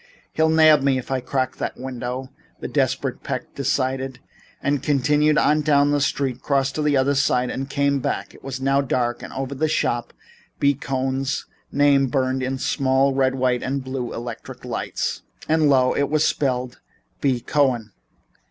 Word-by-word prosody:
"He'll 160 0 +2
nab 155 -2 +6
me 135 -1 +2
if 130 - -6
I 130 -1 0
crack 130 +1 -2
that - - -4
window," 130 0 -5 0.3
the - - -4
desperate - - -1
Peck - - -5
decided, 130 0 -1 0.4
and 140 -2 0
continued 150 +2 +2
on 150 +1 +3
down 145 -1 +3
the 145 -1 +1
street, 135 -2 -1
crossed 140 -1 +1
to 155 - -2
the 150 -2 +2
other 135 +2 +2
side 125 -2 +1
and 135 +1 -4
came 140 0 +1
back. - - -3
It - - -17
was 135 -1 -5
now 135 +1 +2
dark 120 -3 -1
and - - -8
over 135 0 -4
the 140 +3 0
art 155 - -1
shop 120 -5 -1 0.5
B. 140 0 +4
Cohn's 135 0 -2 0.3
name 140 -1 +4
burned 130 0 0
in 130 +1 -2
small 135 +1 +2
red, 130 0 +2
white 125 -1 +1
and 135 0 -2
blue 130 -2 -4
electric 120 -1 -7
lights. - - -3 0.3
And 155 -1 +3
lo, 130 -2 +4
it 140 -1 0
was 155 +1 +2
spelled 125 -3 -1 0.4
B. 130 -3 +1
Cohen! 125 -5 0
135 Hz, 175 wpm, -22 LUFS, 130-140 Hz, 0.5 s, nab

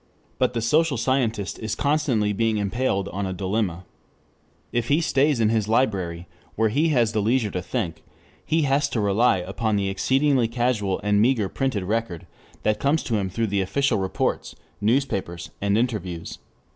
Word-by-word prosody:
But 125 -1 +2
the 115 - -1
social 150 +3 +2
scientist 115 -4 -1
is 110 - -3
constantly 140 -8 +1
being 110 +1 +1
impaled 100 -1 -1
on 100 0 -3
a 95 - -3
dilemma. 95 -1 -2 0.9
If 120 -1 -1
he 145 +5 +3
stays 145 -4 +2
in 110 -2 +3
his 110 -2 +1
library, 95 -8 0 0.3
where 110 0 +2
he 150 +9 +2
has 120 -7 +2
the 110 -2 0
leisure 110 0 +1
to 90 - -3
think, 85 -1 -3 0.4
he 160 0 +1
has 140 +1 +2
to 120 - -2
rely 100 +2 +3
upon 100 +4 -2
the 100 -1 0
exceedingly 130 +5 +2
casual 115 -5 0
and 105 0 +3
meager 115 -3 +2
printed 130 -6 -1
record 105 -3 -2 0.4
that 105 0 +1
comes 145 +3 +1
to 115 -6 -1
him 95 -2 -1
through 100 0 -1
official 120 +3 +1
reports, 95 0 -2 0.3
newspapers, 105 -7 -1
and 100 +1 +2
interviews. 100 -8 -3
110 Hz, 165 wpm, -24 LUFS, 100-130 Hz, 0.9 s, he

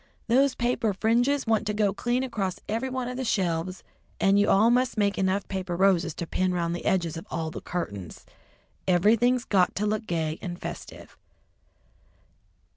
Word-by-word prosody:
"Those 265 +3 +3
paper 235 -4 0
fringes 245 +7 +2
want 220 -2 +1
to 210 - -1
go 205 -2 +2
clean 240 +5 -1
across 195 -8 -3
every 230 +5 -2
one 255 -1 -3
of 250 0 -5
the 260 - -2
shelves, 185 -5 -1 0.4
and 195 +1 +4
you 205 - +3
all 220 +4 +5
must 250 -1 +1
make 200 -1 +2
enough 190 +1 0
paper 185 -2 -3
roses 180 -3 +2
to 170 - -4
pin 185 +2 0
'round 170 -1 -1
the - - -7
edges 170 -4 0
of 165 - -9
all 160 -2 -3
the - - -7
curtains. 100 - -5 0.6
Ever'thing's 230 +7 +3
got 185 -3 +2
to 210 - -1
look 215 +1 -1
gay 160 -2 -2
and 175 -1 -5
festive." - - -8
200 Hz, 175 wpm, -26 LUFS, 175-235 Hz, 0.6 s, all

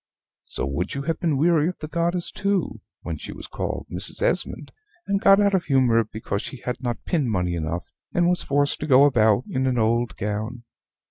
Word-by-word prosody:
So - - -3
would 70 - -3
you 140 - -3
have 165 +1 -2
been 160 -5 +1
weary 160 +1 +3
of 180 - -6
the 155 - -6
goddess 170 +2 -1
too 200 -2 -1 0.2
when - - -4
she - - -7
was - - -9
called - - -4
Mrs. - - -2
Esmond, - - -1 0.3
and 200 0 0
got 195 0 +6
out 200 -1 +3
of 185 -2 +1
humor 125 -5 +3
because 110 -1 -4
she 135 - -7
had 125 -1 -4
not 120 -2 -4
pin 150 -9 0
money 90 -5 0
enough, 85 +1 -4 0.2
and 175 0 +2
was 180 0 +2
forced 145 0 +1
to 150 - -4
go 135 -1 +7
about 110 -5 +4
in 130 0 -1
an 125 -1 +1
old 115 +1 +1
gown. 110 +4 -3
135 Hz, 205 wpm, -24 LUFS, 110-170 Hz, 0.3 s, go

